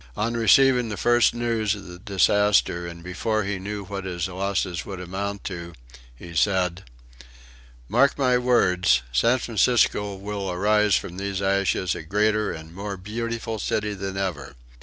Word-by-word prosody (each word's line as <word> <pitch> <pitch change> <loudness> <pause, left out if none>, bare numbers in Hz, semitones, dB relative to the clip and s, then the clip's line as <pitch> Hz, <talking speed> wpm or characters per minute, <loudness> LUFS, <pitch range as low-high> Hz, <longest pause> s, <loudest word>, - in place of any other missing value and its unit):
On 115 +2 -1
receiving 125 +2 +4
the 105 - -4
first 120 -1 +4
news 115 -3 0
of 100 -1 -10
the 90 0 -10
disaster, 100 -3 +2
and 85 0 -9
before 110 +4 -1
he 100 0 -3
knew 100 +1 -5
what 100 0 -5
his 90 -1 -3
losses 95 -1 -2
would 95 -2 -7
amount 100 +2 -4
to, 85 -2 -6 0.4
he 85 +7 -11
said: 90 +1 +1 1.0
"Mark 135 +5 +3
my 130 -3 +3
words, 90 - +3
San 115 - +3
Francisco 110 -3 +1
will 100 0 -5
arise 105 +2 +2
from 90 0 -3
these 100 -1 -3
ashes 95 -2 +1
a - - -6
greater 105 +5 +1
and 80 0 -9
more 100 +1 -5
beautiful 115 +3 -4
city 105 +1 -1
than 95 -1 -5
ever. 75 -8 -4
100 Hz, 155 wpm, -24 LUFS, 90-110 Hz, 1.0 s, receiving